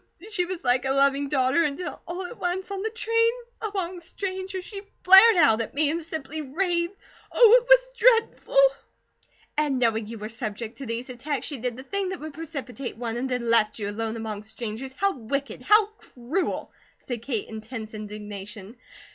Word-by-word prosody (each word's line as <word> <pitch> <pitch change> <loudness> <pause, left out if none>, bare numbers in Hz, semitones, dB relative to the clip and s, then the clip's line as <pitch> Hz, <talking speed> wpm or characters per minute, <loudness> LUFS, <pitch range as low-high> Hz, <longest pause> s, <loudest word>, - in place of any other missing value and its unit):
She 365 -4 0
was 360 -3 -6
like 250 +1 +2
a 265 - +1
loving 275 0 +2
daughter, 265 +3 +3
until 320 +3 -3
all 360 +2 -4
at 470 +7 -9
once, 370 +2 -2
on 390 -1 -3
the 440 - -1
train, 460 0 +2 0.3
among 375 -4 -3
strangers, 375 +1 -5
she 400 -2 -7 0.2
flared 385 +4 +9
out 255 -9 +5
at 225 - -6
me, 295 0 +3
and 335 +2 -2
simply 315 -1 -5
raved. 340 +5 -1 0.4
Oh, 475 0 +8
it - - -18
was - - +6
dreadful!" 470 +1 +3 1.0
"And 290 -3 +1
knowing 225 -3 +1
you 230 +1 -7
were 210 0 -5
subject 225 0 -5
to 270 - -6
these 235 +3 -4
attacks, 275 +3 -3
she 285 -5 -5
did 245 0 -3
the 260 - -8
thing 395 +5 -2
that 375 - -5
would 310 0 -7
precipitate 280 -6 -6
one, 230 -1 -3
and 255 +2 -2
then 250 -2 -2
left 215 -2 +3
you 205 -2 -3
alone 225 +1 -3
among 220 -2 -5
strangers. 220 +3 -6
How 395 0 +1
wicked! 275 +3 -4
How 425 0 +5
cruel!" 360 - -4 0.3
said 245 -3 -6
Kate 235 -3 -3
in 220 -1 -7
tense 220 -1 -7
indignation. 210 0 -8
275 Hz, 185 wpm, -26 LUFS, 230-370 Hz, 1.0 s, flared